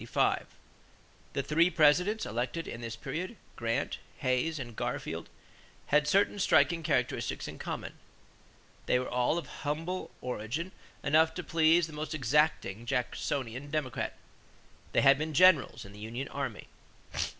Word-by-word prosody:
The 140 - -1
three 165 +5 +4
Presidents 180 +7 +3
elected 125 +9 -3
in 115 - -6
this 115 -1 -5
period, 185 - -5 0.2
Grant, 115 -1 -1 0.2
Hayes, 130 +6 0
and 120 -4 -6
Garfield, - - -3 0.6
had 150 +1 +4
certain 200 +3 +3
striking 170 -2 +4
characteristics 135 -6 -1
in - - -8
common. - - -5 0.9
They - - +4
were 125 - -2
all 125 +6 +1
of 165 -6 -4 0.7
origin 125 - -3
humble - - -27 0.3
enough 160 +3 +4
to 180 - -4
please 165 +1 +4
the 160 - -10
most 155 +1 -4
exacting 130 -5 +1
Jacksonian 125 +2 -2
Democrat. 145 -4 -2 0.8
They - - +3
had 140 0 +6
been 155 0 -3
generals 175 - +5
in 100 - -12
the 105 - -12
union 120 +6 -5
army. 135 -6 -4
145 Hz, 135 wpm, -31 LUFS, 125-160 Hz, 0.9 s, had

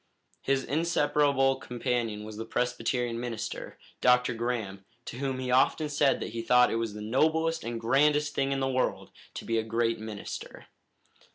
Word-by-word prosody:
His 135 -1 +1
inseparable 145 -3 +2
companion 120 -4 -2
was 110 0 -8
the 110 - -4
Presbyterian 125 0 -1
minister, 120 -2 -5 0.2
Dr. 125 -1 +4
Graham, 115 -5 -3 0.2
to - - -7
whom 135 -1 -2
he 130 -1 -3
often 150 +4 +3
said 145 -1 +2
that - - -4
he 115 - -3
thought 125 +1 +4
it - - 0
was 110 -2 -3
the 105 - -6
noblest 160 +7 +1
and 115 0 -4
grandest 145 +5 +2
thing 135 0 0
in 135 0 -1
the 135 - +1
world 130 -1 -1 0.2
to - - -6
be 115 0 +1
a - - -1
great 115 +1 0
minister. 110 -2 -7
125 Hz, 170 wpm, -28 LUFS, 115-135 Hz, 0.2 s, Dr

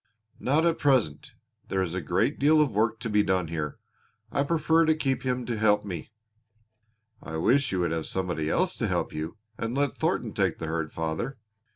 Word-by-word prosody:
"Not 150 +5 +2
at 165 -1 +2
present. 115 - +1 0.3
There 95 -1 0
is 85 -2 -3
a 90 - -2
great 75 - 0
deal 155 +3 +5
of 150 -4 +3
work 110 +2 +1
to 115 - -3
be 105 -1 +3
done 95 -4 0
here. 75 -3 -3 0.5
I - - +1
prefer 160 +2 +3
to 160 - +4
keep 135 -4 0
him 125 -1 -1
to 120 - -2
help 105 -1 +3
me." 90 -4 -6 1.1
"I 80 0 -5
wish 130 - +3
you 95 -2 0
would 85 -2 0
have 80 -1 -2
somebody 90 -5 -2
else - - +2
to - - 0
help - - -1
you 80 +6 -5 0.2
and 115 +2 -2
let 140 -4 +1
Thornton - - -1
take - - +1
the 80 - -5
herd, 80 -1 -2
father." 80 +12 -3
105 Hz, 200 wpm, -27 LUFS, 85-135 Hz, 1.1 s, deal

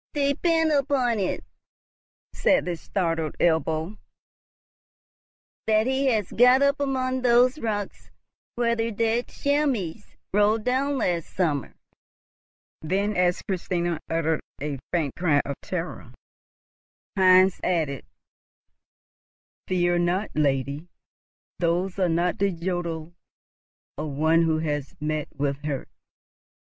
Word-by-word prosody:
"Depend 315 +3 +2
upon 270 -5 +1
it," 190 - -2 0.9
said 280 - +2
the 175 -1 -2
startled 165 -2 -2
Ebbo, 160 +3 0 1.7
"that 215 0 +3
he 265 +2 +1
has 215 -7 +1
got 250 +3 +5
up 280 +1 +2
amongst 260 -2 -1
those 250 +3 +4
rocks 205 -5 -4 0.5
where 235 -1 +1
the 225 0 -1
dead 230 +2 0
chamois 280 - -1 0.3
rolled 210 +2 +3
down 270 +3 0
last 175 -9 -1
summer;" 155 -7 -1 1.1
then, 195 +6 -1
as 180 0 +1
Christina 175 -3 -2
uttered 160 -1 0 0.2
a 145 -1 -4
faint 160 -6 0
cry 160 -5 +2
of 140 - -3
terror, 180 -1 -5 1.0
Heinz 185 -1 +5
added, 155 -7 0 1.6
"Fear 175 -1 +2
not, 180 +4 0
lady, 140 +1 0 0.7
those 175 +3 0
are 185 -2 +2
not 170 +2 0
the 200 0 +2
jodeln 170 -2 -4 0.9
of 155 0 -3
one 160 +4 +3
who 160 -1 +2
has 145 -3 -3
met 150 0 -2
with 140 0 -2
a - - -3
hurt. 140 -3 -4
180 Hz, 110 wpm, -25 LUFS, 160-235 Hz, 1.7 s, got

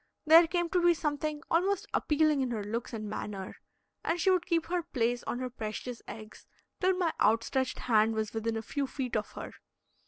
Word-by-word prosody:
There 325 +2 +8
came 345 +1 0
to 360 0 +2
be 345 0 +5
something 300 -1 -2
almost 370 +3 +2
appealing 305 -1 +2
in 260 - 0
her 220 -4 -2
looks 230 +4 -4
and 215 -3 -5
manner, 205 -2 -5 0.5
and 340 +2 0
she 380 - +4
would 360 -1 +1
keep 335 -3 +1
her 355 +1 -1
place 245 -5 -1
on - - -1
her 255 0 -3
precious 230 +1 -5
eggs 215 -1 -10 0.3
till 370 0 +2
my 345 -3 +1
outstretched 230 +4 +2
hand 220 -2 +2
was 220 -1 -2
within 225 0 -1
a 225 - -4
few 280 +4 -2
feet 260 -2 -4
of 210 -1 -2
her. - - -7
260 Hz, 195 wpm, -30 LUFS, 225-330 Hz, 0.5 s, There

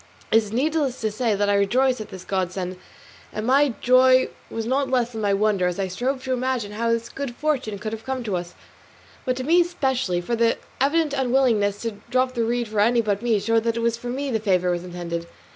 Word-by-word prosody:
It - - +6
is 215 -2 0
needless 280 +1 0
to 220 -1 0
say 215 -2 0
I 205 0 +2
rejoiced 245 +5 +2
over 215 - -8
this 185 -1 -9
godsend, 185 -1 -2 0.5
and 215 - -4
my 270 0 +3
joy 255 +1 +5 0.2
was 225 -1 -4
not 265 +3 0
less 245 -2 +1
than 220 -2 -5
my 200 -1 +2
wonder 200 -3 +2
as 180 - -2
I 190 -1 -1
strove 255 +8 -2
to 260 - -1
imagine 250 -4 -1
how 230 +2 -1
this 230 0 0
good 270 -3 -6
fortune 265 -9 -1
could 215 +2 -5
have 225 0 -6
come 260 -1 -3
to 210 -5 -2
us, 175 0 -5 0.7
but 255 - 0
to 260 - -3
me 340 +5 +5
specially; 265 - -1
for 205 +7 -2
the 230 0 +2 0.2
evident 295 +2 +2
unwillingness 245 -7 +2
to 225 -3 -3
drop 255 +1 +1
the 235 -2 0
reed 240 +1 0
for 210 -1 -2
any 235 +3 +4
but 205 -2 -1
me 235 -3 +2
showed 225 +2 +1
that 230 0 0
it - - -1
was 235 0 +1
for 240 +1 -7
me 270 +2 -2
the 220 - +1
favour 180 -4 +1
was 175 0 -2
intended. 170 -1 -5
230 Hz, 230 wpm, -23 LUFS, 205-260 Hz, 0.7 s, It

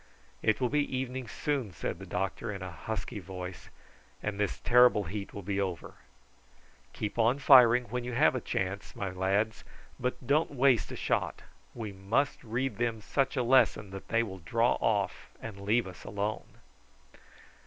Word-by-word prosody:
"It 110 - +2
will 125 -2 +1
be 145 -2 0
evening 130 -1 -4
soon," 135 -4 -2
said - - -4
the - - -9
doctor 95 +3 -2
in 95 -2 -6
a 90 - -6
husky 110 +5 -5
voice, 90 -1 -8 0.5
"and 105 -1 -3
this 105 -3 -1
terrible 125 -3 +5
heat 100 +3 -5
will 100 - -7
be 100 +2 -1
over. 90 -4 -4 1.0
Keep 105 +2 -4
on 115 +4 +4
firing 125 -3 +7
when 125 +1 -4
you 125 0 -4
have 135 +4 +4
a 130 - -2
chance, 95 0 -3
my 100 -2 -3
lads, 95 +4 0 0.4
but 125 +1 -3
don't 145 +1 +2
waste 130 -3 +3
a - - -5
shot. - - -1 0.3
We 110 -3 -5
must 100 +9 -1
read 120 0 -2
them 115 -2 0
such 135 +6 -1
a 125 - +2
lesson 120 -5 +3
that 95 0 -8
they 115 +1 +2
will 95 -4 -7
draw 115 +8 +2
off 105 -3 0
and 110 -3 -8
leave 110 +4 +2
us 90 -2 -10
alone." 105 +1 -4
110 Hz, 170 wpm, -30 LUFS, 100-125 Hz, 1.0 s, firing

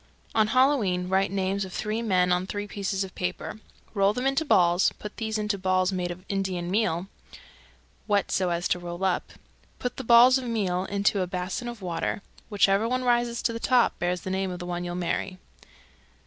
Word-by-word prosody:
On 220 -1 +3
Halloween 220 -8 +2
write 190 +1 +2
names 195 0 -1
of 190 - -7
three 215 +3 -2
men 185 -5 +2
on 180 +1 +1
three 205 +1 -4
pieces 200 -1 -2
of 190 - -8
paper, 180 +4 -4 0.3
roll 200 -1 +3
them 250 +4 -3
into 275 +3 +2
balls, 175 - +4
put 210 - -9
these 220 -1 -2
into 210 -1 -1
balls 185 0 +1
made 180 -2 -2
of 180 +2 -8
Indian 185 -3 -2
meal 190 -4 +1 1.0
(wet 205 -2 +1
so 185 -2 +1
as 170 +1 -1
to 180 - +1
roll 175 +1 -6
up), 190 -2 -1 0.4
put 250 -1 -4
the 265 - -4
balls 245 +2 +7
of 255 - -7
meal 195 -6 -1
into 200 0 +1
a 180 - -1
basin 185 +6 -4
of 235 -4 -7
water: 175 +2 -2 0.3
whichever 205 +1 +3
one 255 +1 0
rises 240 -1 +1
to 230 - +1
the 230 - -4
top 245 0 +2
bears 175 0 -1
the 185 - -5
name 190 0 -1
of 180 - -5
the 175 - -7
one 175 0 -3
you'll 175 0 -4
marry. 180 +1 -2
195 Hz, 200 wpm, -26 LUFS, 180-220 Hz, 1.0 s, balls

